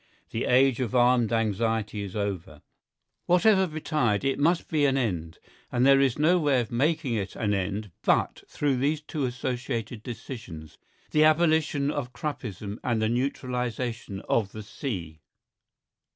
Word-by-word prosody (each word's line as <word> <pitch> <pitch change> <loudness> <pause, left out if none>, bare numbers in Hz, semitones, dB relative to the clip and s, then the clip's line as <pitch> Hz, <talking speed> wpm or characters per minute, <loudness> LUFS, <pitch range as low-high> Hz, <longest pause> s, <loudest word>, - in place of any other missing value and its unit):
The 115 - -2
age 130 0 +4
of 130 -1 -2
armed 120 -2 +4
anxiety 110 -1 0
is 100 -1 -6
over. 95 -7 -4 0.6
Whatever 190 +2 +4
betide, 150 - 0
it 135 0 0
must 165 +4 +2
be 150 -2 +2
an 135 0 +1
end. 85 -10 -2 0.3
And 125 +1 +2
there 135 0 +6
is 135 -3 +2
no 165 +4 +4
way 145 -5 +2
of 120 - -3
making 145 +2 +1
it 100 -4 -3
an 105 -3 0
end 100 +1 -2
but - - +1
through 140 -3 0
these 145 +4 0
two 150 -2 -3
associated 120 -2 -3
decisions, 110 - -8 0.3
the 155 - +4
abolition 155 -3 +3
of 130 -4 -4
Kruppism 110 -7 -5
and 120 -3 0
the 110 0 +1
neutralisation 125 -4 -2
of 105 -4 0
the 110 - -7
sea. 90 - -5
125 Hz, 150 wpm, -27 LUFS, 110-140 Hz, 0.6 s, there